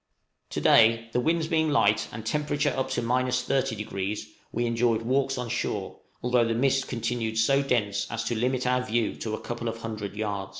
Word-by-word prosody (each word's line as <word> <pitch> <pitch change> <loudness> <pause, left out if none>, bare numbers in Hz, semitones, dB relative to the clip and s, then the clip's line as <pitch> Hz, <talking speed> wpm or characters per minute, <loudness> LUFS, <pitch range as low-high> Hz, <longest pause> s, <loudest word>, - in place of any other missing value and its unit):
To - - -3
day, 115 0 +5
the 125 - +1
winds 160 +4 +1
being 160 -2 +2
light 110 -8 +3
and 110 0 -7
temperature 145 +2 0
up 130 - -1
to - - -1
30°, 115 -5 -1 0.3
we 120 +1 -1
enjoyed 115 -1 +1
walks 135 +2 +1
on 125 -1 -3
shore, - - -3 0.2
although 125 -1 +3
the 115 0 0
mist 135 +2 +2
continued 115 -2 -2
so 135 +5 +4
dense 105 -7 0
as 115 +1 -3
to 115 +1 -2
limit 125 +3 0
our 125 0 +2
view 115 -2 0
to 110 -1 -3
a - - -8
couple 120 0 -4
of 115 - -3
hundred 105 -3 -5
yards. 100 -2 -3
120 Hz, 185 wpm, -27 LUFS, 110-130 Hz, 0.3 s, day